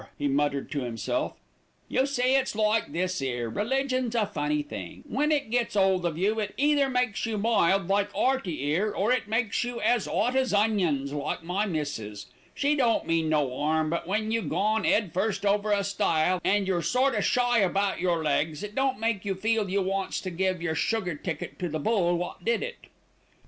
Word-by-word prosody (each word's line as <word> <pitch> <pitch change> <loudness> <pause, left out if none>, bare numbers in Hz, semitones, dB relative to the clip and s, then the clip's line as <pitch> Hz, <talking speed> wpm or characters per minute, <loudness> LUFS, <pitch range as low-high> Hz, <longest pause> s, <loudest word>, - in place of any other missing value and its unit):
he 145 - -1
muttered 140 0 0
to 145 - -1
himself. 115 -3 -2 0.5
"You 265 +2 +1
see, 255 -2 +1
it's 265 -4 +1
like 215 -3 +1
this 185 +1 -1
'ere, 120 -3 -2
religion's 255 - -1
a 225 -3 +3
funny 150 -6 -1
thing. 95 -11 -8
When 300 +3 0
it 285 -7 0
gets 240 -3 0
'old 190 -3 +3
of 160 -2 -4
you, 210 +5 +1
it 210 -1 -3
either 285 -1 +3
makes 250 -5 0
you 220 -1 -2
mild, 195 -4 +2
like 200 +1 +1
'Earty 225 - 0
'ere, 205 +6 0
or 210 +5 +1
it 250 -4 +1
makes 225 0 0
you 245 0 -4
as 230 0 +1
'ot 245 +4 0
as 260 -5 +2
onions, 180 -10 +1
like 145 +2 -3
my 190 +5 -1
missis. 115 - -4 0.3
She 290 +1 +2
don't 240 -5 +2
mean 165 -1 +1
no 145 -5 +1
'arm; 155 +1 +1
but 170 - -2
when 215 +3 -1
you 230 0 +1
gone 215 +1 0
'ead 205 -7 +2
first 200 +2 -1
over 205 +1 +2
a 200 -1 +2
stile, 180 -2 +1
an' 200 0 +2
your 185 -2 0
sort 260 +8 +2
o' - - 0
shy 245 -1 +2
about 195 0 +1
yer 170 -2 0
legs, 150 +2 0
it 210 0 -6
don't 270 -2 0
make 225 -3 -1
you 195 -2 -2
feel 215 +1 0
you 195 +1 +1
wants 195 +1 -2
to 185 - -5
give 185 0 -1
yer 160 -2 0
sugar 180 +2 0
ticket 160 +1 -6
to 180 - -2
the 155 - -2
bull 175 0 +1
wot 175 +1 -5
did 235 +3 +1
it." 485 0 -8
200 Hz, 200 wpm, -27 LUFS, 165-230 Hz, 0.5 s, a